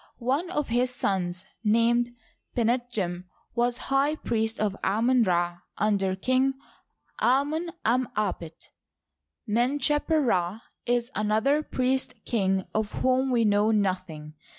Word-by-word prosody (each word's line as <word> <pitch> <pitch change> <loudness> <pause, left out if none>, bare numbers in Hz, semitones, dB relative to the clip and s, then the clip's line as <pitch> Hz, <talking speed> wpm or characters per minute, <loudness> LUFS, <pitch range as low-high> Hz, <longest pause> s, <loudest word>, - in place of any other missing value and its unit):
One 275 +9 -1
of 300 -5 -2
his 245 +2 +2
sons 180 -4 -1 0.2
named 235 +2 +2 0.4
Pinetjem 225 -7 -1 0.3
was 240 0 +1 0.2
high 280 +3 +3
priest 225 -5 -2
of 210 -2 0
Amoh 230 +3 +3
Ra 175 -1 0 0.2
under 195 -2 +1
King 255 +6 +1 0.7
Amoft' 290 +7 +2 0.2
em 245 +3 +2
apet, 180 -6 -4 0.8
Men^cheper 290 +7 +2 0.4
Rd 225 - -16 0.3
is 240 +1 0
another 220 +8 +2
priest 260 -2 -1
king 195 -4 0
of 215 -1 -1
whom 260 +1 +2
we 235 -3 +2
know 205 +1 +3
nothing. 185 -7 -1
230 Hz, 115 wpm, -27 LUFS, 200-255 Hz, 0.8 s, high